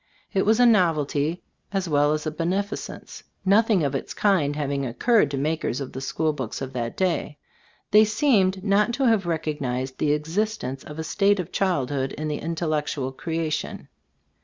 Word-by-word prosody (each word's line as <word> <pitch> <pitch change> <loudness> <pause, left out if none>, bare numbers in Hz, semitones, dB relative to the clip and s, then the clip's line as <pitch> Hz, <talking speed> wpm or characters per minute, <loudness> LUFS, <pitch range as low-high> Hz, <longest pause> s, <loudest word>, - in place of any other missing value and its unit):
It 195 0 +1
was 220 +2 +4
a 245 - +6
nov 185 -8 +5
elty, 150 +3 -1 0.3
as 195 -2 -1
well 145 -1 +3
as 155 0 -1
a 155 - -1
beneficence; 185 +6 -4 0.2
nothing 205 -2 +4
of 140 -1 0
its 135 - -4
kind 170 -9 +2
having 140 -2 -1
occurred 210 - +2
to 140 - -3
mak 155 +3 -1
ers 120 - -1
of 135 - -5
the 130 - -5
school 155 +3 -1
books 130 -6 -5
of 135 -1 -6
that 120 -2 -3
day. 170 -5 -1 0.5
They 210 +1 +8
seemed 210 -5 +2
not 210 +3 +2
to 275 - -1
have 220 -6 +3
recognized 140 -6 -2
the 150 -1 +2
existence 155 -3 -2
of 150 - -9
a 160 - -3
state 200 +4 +2
of 180 0 -4
childhood 140 -8 0
in 155 0 -4
the 150 - -2
intellectual 155 -4 -2
creation. 160 +2 -3
160 Hz, 180 wpm, -24 LUFS, 145-195 Hz, 0.5 s, They